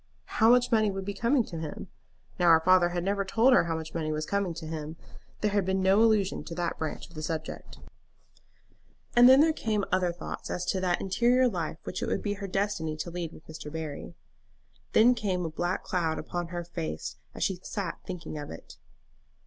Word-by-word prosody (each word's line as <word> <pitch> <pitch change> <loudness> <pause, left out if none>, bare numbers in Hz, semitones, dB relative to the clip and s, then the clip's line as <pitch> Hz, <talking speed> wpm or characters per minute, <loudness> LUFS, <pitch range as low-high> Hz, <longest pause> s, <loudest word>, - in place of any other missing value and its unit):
How 225 - +7
much 245 0 +4
money 215 -2 +4
would 195 -1 -4
be 200 - -3
coming 240 +5 +2
to 170 -6 -7
him? 155 -2 -6 0.5
Now 175 -1 +5
her 165 -1 +8
father 180 +1 +4
had 175 0 -2
never 200 +1 0
told 230 +7 +4
her 250 - +5
how 165 -1 -1
much 160 0 -6
money 155 -2 -2
was 155 0 -2
coming 200 -3 -1
to 165 -1 -7
him. 155 0 -5 0.5
There 210 - +1
had 200 -1 +2
been 190 +1 0
no 195 +3 +5
allusion 215 -4 +2
to 170 - -6
that 175 -1 -2
branch 155 -2 -4
of - - -20
the 155 - -7
subject. 155 0 -5 1.4
And 240 +1 +9
then 265 +2 +8
there 320 +1 +4
came 215 -7 -1
other 180 -2 +2
thoughts 170 -1 -7
as 180 - -2
to 190 - -1
that 180 -1 +1
interior 245 +6 +3
life 170 -8 -3
which 185 - -5
it - - -1
would - - -1
be 205 - 0
her 200 -1 -6
destiny 190 -5 -1
to 170 +2 -5
lead 170 -2 -4
with 155 - -15
Mr. 155 -1 -8
Barry. 155 -2 -6 0.8
Then 235 +3 +6
came 195 -7 -1
a 160 - -3
black 175 +3 -2
cloud 165 -3 -1
upon 175 -1 -4
her 175 0 -4
face 80 - -5 0.2
as - - -2
she 190 -2 0
sat 200 -1 -4
thinking 175 -4 -6
of 145 - -7
it. 80 - -11
180 Hz, 215 wpm, -28 LUFS, 160-205 Hz, 1.4 s, And